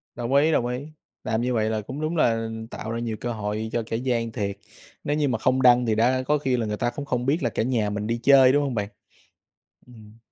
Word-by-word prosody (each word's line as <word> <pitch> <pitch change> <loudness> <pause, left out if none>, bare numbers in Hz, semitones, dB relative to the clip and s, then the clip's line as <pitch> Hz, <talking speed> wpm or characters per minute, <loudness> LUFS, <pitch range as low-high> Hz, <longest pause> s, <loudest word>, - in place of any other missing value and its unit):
Đồng 120 +2 -2
ý, 150 +3 +4
đồng 120 - +2
ý, 125 0 -2 0.5
làm 110 +1 -1
như 125 0 0
vậy 110 -1 +1
là 110 - -1
cũng 130 +7 -7
đúng 155 +2 -2
là 115 -6 +1 0.2
tạo 110 - -6
ra 115 - -3
nhiều 115 -2 -3
cơ 120 0 -3
hội 105 0 -3
cho 120 - 0
kẻ 115 - -2
gian 115 -2 -1
thiệt, 100 -4 -3 0.5
nếu 145 - 0
như 150 -2 +1
mà 120 -3 -1
không 130 +3 +1
đăng 125 -1 +5
thì 110 - +2
đã 125 +4 +2
có 150 +3 +1
khi 130 -3 0
là 115 -2 -2
người 105 0 -2
ta 120 - -1
cũng 140 +4 -6
không 125 -3 -2
biết 150 +5 +1
là 120 - 0
cả - - -1
nhà 115 -4 0
mình 105 0 -3
đi 115 +1 -2
chơi 135 -1 +6
đúng 145 +1 +3
hông 135 -3 -2
bạn? 105 -2 -2 1.0
Ừm. 110 -2 -16
120 Hz, 260 wpm, -24 LUFS, 110-130 Hz, 1.0 s, chơi